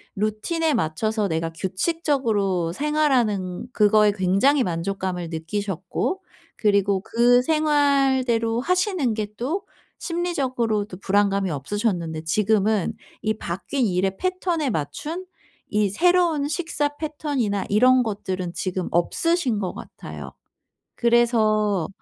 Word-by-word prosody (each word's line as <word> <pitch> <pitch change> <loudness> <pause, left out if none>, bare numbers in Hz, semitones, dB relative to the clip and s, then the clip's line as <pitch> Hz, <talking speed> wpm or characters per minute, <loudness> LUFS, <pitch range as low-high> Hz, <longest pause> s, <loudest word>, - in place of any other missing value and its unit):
루틴에 215 - 0
맞춰서 215 - 0
내가 165 -1 -2
규칙적으로 200 - 0
생활하는 245 -10 0
그거에 210 -2 +4
굉장히 200 +9 +2
만족감을 180 -1 -3
느끼셨고 190 - -3 0.4
그리고 200 -2 +2
그 240 +4 +4
생활대로 270 -6 +2
하시는 360 - +1
게 215 -1 -2
또 320 - -2 0.3
심리적으로도 255 - -1
불안감이 200 0 +1
없으셨는데 170 - -2
지금은 210 +3 +1 0.3
이 215 - +1
바뀐 205 +10 -2
일의 190 -1 0
패턴에 360 -5 -1
맞춘 225 - -4 0.4
이 210 -1 +1
새로운 340 - +2
식사 295 -3 -1
패턴이나 285 -10 -2
이런 255 +5 +5
것들은 190 -5 -4
지금 185 -1 -3
없으신 260 - +1
것 185 -3 -3
같아요. - - -9 0.6
그래서 215 -6 +2
215 Hz, 270 characters per minute, -23 LUFS, 190-285 Hz, 0.6 s, 이런